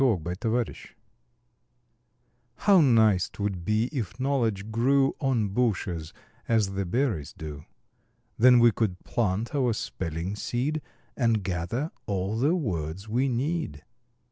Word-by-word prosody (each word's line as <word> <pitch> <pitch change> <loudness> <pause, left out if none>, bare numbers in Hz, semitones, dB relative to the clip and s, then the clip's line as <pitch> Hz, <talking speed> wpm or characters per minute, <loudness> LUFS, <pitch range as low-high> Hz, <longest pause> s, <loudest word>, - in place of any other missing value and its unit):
EASY 90 - +1
KNOWLEDGE 115 +1 -2 1.6
How 195 -4 +5
nice 110 - +4
'twould 100 -4 -3
be 105 +4 +1
if 120 - -4
knowledge 115 -7 0
grew 135 +4 +3
On 120 -7 +1
bushes, 95 -8 -1 0.4
as 110 -4 +2
the 95 -1 -2
berries 105 - -1
do! 75 -5 -8 0.7
Then 125 +2 +6
we 120 -1 +6
could 100 -5 -2
plant 110 +1 -1
our 130 -5 +2
spelling 85 -1 -4
seed, 135 +8 -2 0.3
And 115 -5 +1
gather 95 - -2 0.2
all 100 +1 -1
the 150 +8 +3
words 95 - -3
we 125 +5 +1
need. 125 - -2
110 Hz, 120 wpm, -27 LUFS, 95-125 Hz, 1.6 s, Then